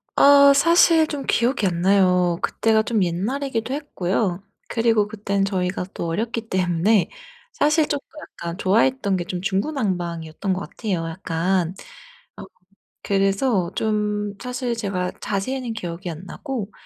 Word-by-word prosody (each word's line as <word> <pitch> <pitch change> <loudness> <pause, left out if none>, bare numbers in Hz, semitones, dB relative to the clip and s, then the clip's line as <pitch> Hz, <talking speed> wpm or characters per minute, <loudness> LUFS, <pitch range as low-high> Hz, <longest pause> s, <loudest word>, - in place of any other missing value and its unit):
아 280 0 +7
사실 330 +1 +5
좀 280 -4 -5
기억이 235 -3 +1
안 170 -1 -2
나요. 180 -2 +3
그때가 220 0 +2
좀 215 -3 +1
옛날이기도 230 +8 -2
했고요. 195 -9 -2 0.2
그리고 225 -3 +2
그때는 200 -2 -1
저희가 180 -2 -2
또 170 - -4
어렸기 225 +6 -3
때문에 185 +3 +2 0.5
사실 300 +1 +3
쪼끔 285 -1 -3
약간 170 +1 -7
좋아했던 205 0 +2
게 175 - -2
좀 180 0 -4
중구난방이었던 190 - -2
것 185 - -2
같아요 185 -7 -3
약간. 175 +1 -1 0.6
어 - - -8 0.6
그래서 195 -1 +1
좀 210 -1 -1
사실 250 -1 -3
제가 185 -4 -2
자세히는 230 +4 -3
기억이 175 -2 -5
안 165 +3 -8
나고 235 -7 -5
200 Hz, 290 characters per minute, -22 LUFS, 180-240 Hz, 0.6 s, 아